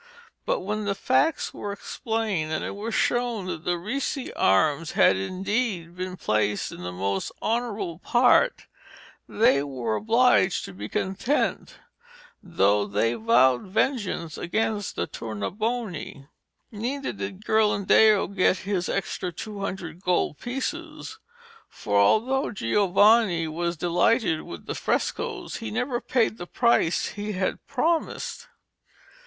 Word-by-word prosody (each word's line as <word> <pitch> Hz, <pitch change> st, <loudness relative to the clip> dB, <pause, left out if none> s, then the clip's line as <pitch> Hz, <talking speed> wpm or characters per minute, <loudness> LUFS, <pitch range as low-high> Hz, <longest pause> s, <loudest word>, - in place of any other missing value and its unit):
But -, -, +1 dB
when 210 Hz, +2 st, -3 dB
the 200 Hz, -1 st, 0 dB
facts 260 Hz, +9 st, +1 dB
were 205 Hz, -, -5 dB
explained, 205 Hz, -5 st, -2 dB
and 155 Hz, -, -2 dB
it -, -, -5 dB
was 220 Hz, +2 st, -4 dB
shown 240 Hz, -5 st, 0 dB
that 170 Hz, -3 st, -5 dB
the 175 Hz, 0 st, +1 dB
Ricci 255 Hz, -, -3 dB
arms 145 Hz, +12 st, +2 dB
had -, -, +5 dB
indeed 185 Hz, -, -2 dB
been 185 Hz, 0 st, -5 dB
placed 105 Hz, -, 0 dB
in -, -, -9 dB
the 90 Hz, 0 st, -5 dB
most 95 Hz, +2 st, -2 dB
honourable 220 Hz, -8 st, -2 dB
part, 245 Hz, -, +3 dB, 0.6 s
they 175 Hz, -11 st, +3 dB
were 125 Hz, -6 st, -3 dB
obliged 225 Hz, -, +3 dB
to 100 Hz, -, -9 dB
be 105 Hz, +3 st, -7 dB
content, 200 Hz, +9 st, -1 dB, 0.7 s
though 105 Hz, -, +2 dB
they 105 Hz, +3 st, +1 dB
vowed 130 Hz, -, +3 dB
vengeance 190 Hz, -, -1 dB
against 210 Hz, +2 st, -1 dB
the -, -, -1 dB
Tournabuoni. 175 Hz, -, -4 dB, 0.4 s
Neither 255 Hz, +6 st, -3 dB
did 200 Hz, 0 st, -7 dB
Ghirlandaio 215 Hz, -1 st, +4 dB
get 185 Hz, 0 st, +3 dB
his 190 Hz, -3 st, -1 dB
extra 185 Hz, -1 st, -2 dB
two 205 Hz, +4 st, -7 dB
hundred 185 Hz, -4 st, -5 dB
gold 180 Hz, -5 st, 0 dB
pieces, 310 Hz, -, -5 dB, 0.5 s
for 100 Hz, -1 st, -1 dB
although 255 Hz, -, +2 dB
Giovanni 195 Hz, -, +3 dB
was 170 Hz, +2 st, -2 dB
delighted 175 Hz, +1 st, +2 dB
with 85 Hz, -2 st, -9 dB
the -, -, -3 dB
frescoes -, -, -2 dB
he 110 Hz, -, -5 dB
never 240 Hz, -, -2 dB
paid 230 Hz, -3 st, 0 dB
the 175 Hz, -, -6 dB
price 235 Hz, -8 st, +2 dB
he 210 Hz, +1 st, -5 dB
had 185 Hz, 0 st, -2 dB
promised. 330 Hz, -, -1 dB
195 Hz, 125 wpm, -25 LUFS, 160-230 Hz, 0.7 s, had